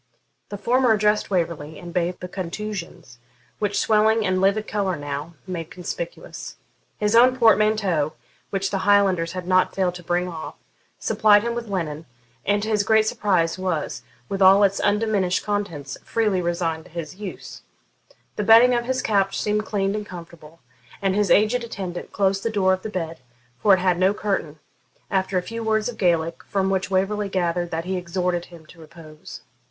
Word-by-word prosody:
The 205 - -5
former 245 +3 +3
addressed 210 0 +1
Waverley, 165 -5 -2
and 175 -1 -9
bathed 180 0 -1
the 180 - -5
contusions, 180 - -6 0.4
which 205 -1 -1
swelling 220 0 +3
and 185 0 +1
livid 200 +3 +2
colour 200 -4 -1
now 145 +2 -6
made 170 -4 -5
conspicuous. - - -7 0.4
His 210 +1 +1
own 250 +2 +6
portmanteau, 215 - +3 0.4
which 195 0 -2
the 195 - -1
Highlanders 190 -4 +3
had 185 -1 -5
not 185 0 +2
failed 185 -2 +1
to 180 0 -10
bring 175 +1 0
off, 165 -3 -7 0.4
supplied 205 -1 +4
him 235 0 -1
with 235 -1 -5
linen, 165 -6 -4 0.4
and 205 0 +2
to 215 - -3
his 210 -2 +2
great 220 +2 +3
surprise 185 -6 0
was, 180 -5 -2 0.3
with 195 0 -4
all 195 +2 +7
its 200 0 +2
undiminished 205 -3 +1
contents, 175 -10 -3
freely 210 -5 0
resigned 170 -2 -2
to - - -15
his 170 +1 -7
use. 200 -3 -8 0.8
The 210 - 0
bedding 230 +4 +7
of 240 -1 0
his 255 +1 -1
couch 195 -2 +1
seemed 210 0 -1
clean 195 -1 0
and 210 0 -3
comfortable, 165 -2 -12 0.4
and 195 -2 0
his 205 0 +1
aged 220 +4 +3
attendant 190 -6 -6
closed 195 -1 +1
the 230 - -1
door 195 -4 +2
of 185 - -2
the 220 - -5
bed, 165 -5 -4 0.4
for 200 -2 +6
it - - -3
had 180 -1 +1
no 190 +2 +3
curtain, 185 -7 -2 0.5
after 190 -1 0
a 180 - 0
few 230 +4 -6
words 220 -1 +1
of 230 - -9
Gaelic, 170 -3 +1
from 195 -1 0
which 190 0 -1
Waverley 195 +2 0
gathered 175 -2 -1
that 165 0 -3
he 185 0 -2
exhorted 180 0 -2
him 170 -3 -15
to 165 +2 -17
repose. 160 -1 -12
190 Hz, 180 wpm, -23 LUFS, 175-210 Hz, 0.8 s, all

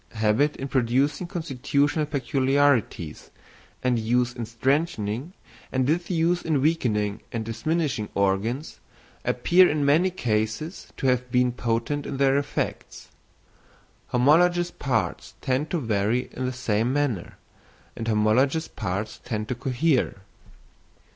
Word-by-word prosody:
Habit 110 +7 +2
in 135 - -5
producing 135 +6 +1
constitutional 145 -1 0
peculiarities, 135 - +1 0.5
and 125 -2 +2
use 120 +2 +1
in 120 -3 -5
strengthening, 130 - -1 0.4
and 130 -1 +1
disuse 170 +3 +1
in 155 -3 0
weakening 110 -9 0
and 115 -2 -3
diminishing 115 0 -1
organs, 100 +9 0 0.4
appear 180 +1 +4
in 145 -1 0
many 160 +6 +4
cases 115 - -2
to - - -4
have 125 -1 +1
been 125 0 +3
potent 120 +4 -2
in - - -4
their 135 0 +3
effects. 145 0 -4 1.0
Homologous 175 +7 +3
parts 125 -6 -2
tend 130 +4 -1
to 175 - 0
vary 115 -1 0
in 130 0 -3
the - - -1
same 115 -1 0
manner, 140 -10 -1 0.6
and 115 - -5
homologous 120 +9 +2
parts 100 +4 -4
tend 110 -3 -3
to - - 0
cohere. 130 -2 0
130 Hz, 120 wpm, -25 LUFS, 115-150 Hz, 1.0 s, appear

